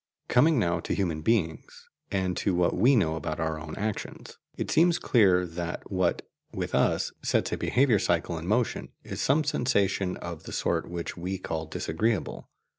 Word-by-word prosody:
Coming 150 +5 +4
now 85 -6 +1
to - - -2
human 85 -6 -1
beings, 85 -5 -1 0.2
and 95 -2 -1
to 95 - 0
what 90 0 +2
we 125 +9 +5
know 80 -8 +2
about 80 - -4
our 80 -1 -1
own 80 0 -7
actions, 105 +1 -5 0.2
it - - -3
seems 170 +1 +4
clear 95 - +4
that 85 +2 -6
what, 95 -2 0 0.2
with - - -4
us, - - +2
sets - - 0
a - - +1
behaviour 125 -5 +3
cycle 85 -2 0
in 80 - -7
motion 115 +4 0
is - - -5
some 150 +3 +3
sensation 100 -10 0
of 85 -2 -7
the - - -7
sort - - -1
which 85 -1 -5
we 90 +2 -3
call 80 -3 -4
disagreeable. 95 +7 -2
95 Hz, 175 wpm, -27 LUFS, 85-115 Hz, 0.2 s, we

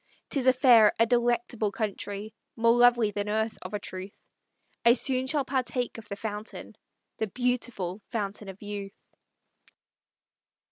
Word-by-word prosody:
'Tis 265 -3 +1
a 255 - +7
fair, 240 -5 +6
a 230 - +5
delectable 240 -2 +1
country. 205 0 -4 0.2
More 230 +1 +4
lovely 240 -3 +5
than 205 0 -3
earth, 220 +1 -1
of 185 +3 -6
a - - -2
truth; 190 -1 -7 0.6
I 235 - +7
soon 260 -1 +1
shall 285 0 +1
partake 250 -2 -2
of 220 - -14
the 200 - -4
fountain, 210 +1 -6 0.4
The 220 - -1
beautiful 230 -5 -2
Fountain 205 -3 -4
of 190 +2 -11
Youth!" 205 -1 -6
220 Hz, 140 wpm, -28 LUFS, 205-245 Hz, 0.6 s, a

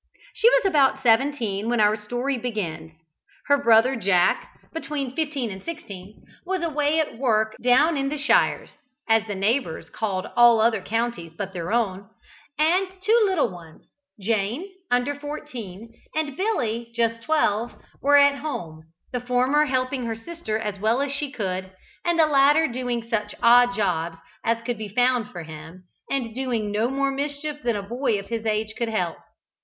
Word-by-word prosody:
She 465 - +5
was - - +3
about 290 -8 +3
seventeen 225 -4 +1
when 240 -1 +1
our 210 0 +4
story 245 +6 -2
begins; 170 -10 -4 0.5
her 285 0 +3
brother 235 +3 +5
Jack, 205 - +1
between 290 -5 -4
fifteen 290 -7 -2
and 190 0 -8
sixteen, 205 - -9 0.2
was 370 -1 -2
away 300 -1 +1
at 295 -7 -2
work 220 -4 +1
"down 275 +6 +4
in 275 0 0
the 300 - -3
sheers" 280 - -2
(shires), - - +3 0.4
as 225 -1 +3
the 205 - -4
neighbours 200 -2 -1
called 195 -4 -3
all 240 -1 +7
other 220 -2 +2
counties 225 -6 -3
but 195 -1 -5
their 175 +1 -4
own; 200 -4 -1 0.5
and 345 +6 +3 0.2
two 445 +4 +4
little 375 -6 +1
ones, 170 -3 -13 0.3
Jane, 225 - -1 0.2
under 245 +3 +1
fourteen, 250 -8 -8 0.2
and 305 -3 -1
Billy, 240 - -1
just 230 -1 0
twelve, 235 -6 +1 0.3
were 285 +1 +5
at 280 0 +5
home, 165 - -6 0.3
the 250 - -2
former 250 +4 +2
helping 255 -2 -1
her 225 - -2
sister 225 -2 -4
as 210 -3 -4
well 220 +5 +2
as 280 -1 -1
she 285 0 -2
could, 190 -5 -4 0.3
and 345 -1 +1
the 320 - +6
latter 295 +2 +4
doing 240 -1 -3
such 210 -3 -2
odd 245 +1 +6
jobs 170 -5 -1 0.3
as 230 0 0
could 240 -2 -3
be 215 -2 -5
found 245 +1 +2
for 175 -2 -7
him, 160 +3 -11 0.3
and 250 -5 -2
doing 235 -5 -2
no 220 +4 +1
more 275 +1 0
mischief 290 +2 -4
than 235 -2 0
a 200 - -3
boy 240 +2 -1
of 200 0 -8
his 225 -1 -3
age 215 0 -1
could 235 -1 -2
help. 180 -7 -1
235 Hz, 170 wpm, -24 LUFS, 210-280 Hz, 0.5 s, all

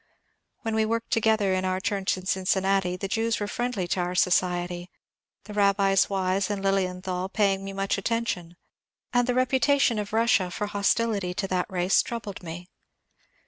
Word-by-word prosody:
When 225 -1 -2
we 220 0 +2
worked 230 +1 -2
together 220 -5 +2
in 185 0 0
our 185 0 0
church 195 -1 -1
in 185 - -9
Cincinnati 190 -1 +1
the 195 - -4
Jews 225 +2 0
were 205 - -1
friendly 235 -4 -2
to 185 - 0
our 180 0 -1
society, 175 -1 +1 0.5
the 210 - -10
Rabbis 200 -1 +3
Wise 190 0 0
and 200 -1 -3
Lilienthal 185 -1 -1
paying 195 -2 +1
me 195 - -5
much 195 0 -1
attention, 195 -6 -2 0.6
and 245 0 +3
the 250 - +1
reputation 255 -1 +3
of 205 -1 -4
Russia 220 -4 +2
for 210 +4 -3
hostility 205 -2 0
to 195 0 -2
that 180 -1 0
race 180 0 +3
troubled 220 -4 -6
me. 175 0 -8
195 Hz, 165 wpm, -26 LUFS, 185-220 Hz, 0.6 s, Rabbis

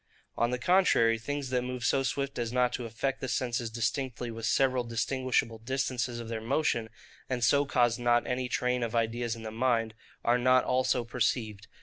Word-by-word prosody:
On 120 - +1
the 125 - -1
contrary, 120 -7 +3
things 140 +2 -4
that 125 -1 +1
move 125 -1 -4
so 135 - +3
swift 140 0 -2
as 115 -1 -2
not 125 0 +2
to 125 - -3
affect 135 +4 -3
the 130 - -3
senses 120 -2 -1
distinctly 120 +1 -2
with 115 -1 -4
several 130 +1 +2
distinguishable 120 0 -1
distances 125 0 -2
of 115 - -7
their 115 -1 -4
motion, 115 -2 0 0.4
and 125 -2 -1
so 140 +5 +4
cause 120 -3 +2
not 120 0 +2
any 125 0 -2
train 125 +1 0
of 115 -1 -2
ideas 115 0 0
in 115 - -10
the 110 - -5
mind, 115 -1 0 0.3
are 120 +1 +3
not 130 +1 +4
also 125 -1 +1
perceived. 115 -3 -2
120 Hz, 190 wpm, -29 LUFS, 115-130 Hz, 0.4 s, so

